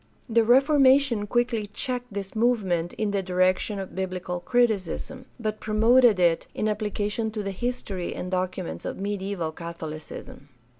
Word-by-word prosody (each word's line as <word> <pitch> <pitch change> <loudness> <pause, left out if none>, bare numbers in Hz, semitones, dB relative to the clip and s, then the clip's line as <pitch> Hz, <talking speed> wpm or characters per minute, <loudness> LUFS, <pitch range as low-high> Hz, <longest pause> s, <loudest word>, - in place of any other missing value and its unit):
The 230 0 +3
Reformation 265 -2 +4
quickly 240 -2 0
checked 245 +3 -4
this 195 -1 -5
movement 195 -8 +1
in 215 -2 -1
the 200 -1 0
direction 185 +2 +1
of 195 -1 -6
biblical 185 -1 -3
criticism, 240 +3 0
but 215 -2 -3
promoted 225 0 +4
it 170 -2 +3
in 215 - 0
application 210 +1 -1
to 215 -1 -4
the 195 - -3
history 200 -4 -3
and 180 - -5
documents 180 - -3
of - - -4
mediaeval 195 -4 -3
Catholicism. 155 -3 -8
205 Hz, 140 wpm, -26 LUFS, 185-235 Hz, -, Reformation